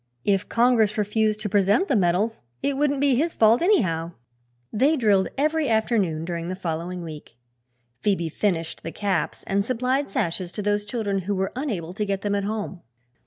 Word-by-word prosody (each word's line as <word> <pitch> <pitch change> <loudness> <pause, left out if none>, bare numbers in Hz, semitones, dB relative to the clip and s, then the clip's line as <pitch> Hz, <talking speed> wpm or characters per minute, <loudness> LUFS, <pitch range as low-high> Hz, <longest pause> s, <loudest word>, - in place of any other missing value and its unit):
If 195 -1 +1
"Congress" 230 -3 +3
refused 215 0 +1
to 210 - -2
present 205 - +3
the 275 - +2
medals 195 +4 +1 0.2
it 280 - +1
wouldn't 285 0 +1
be 285 -2 +4
his 315 +7 0
fault, 225 +2 +5
anyhow. 175 - +2 0.6
They 275 +8 +3
drilled 205 -6 +3
every 305 0 +1
afternoon 210 -8 +1
during 170 0 -4
the 185 - -3
following 175 0 -4
week. 150 -7 -10 0.6
Phoebe 190 -3 0
finished 165 -1 -2
the 165 - -6
caps 195 -5 -2
and 200 +1 +1
supplied 255 +4 0
sashes 175 -1 -2
to 210 - -4
those 205 0 0
children 210 -3 -1
who 200 +2 -2
were 190 0 -1
unable 205 - -3
to 210 +2 -2
get 200 -1 -2
them 205 -1 0
at 200 -1 0
home. 205 -4 -4
205 Hz, 175 wpm, -24 LUFS, 180-235 Hz, 0.6 s, fault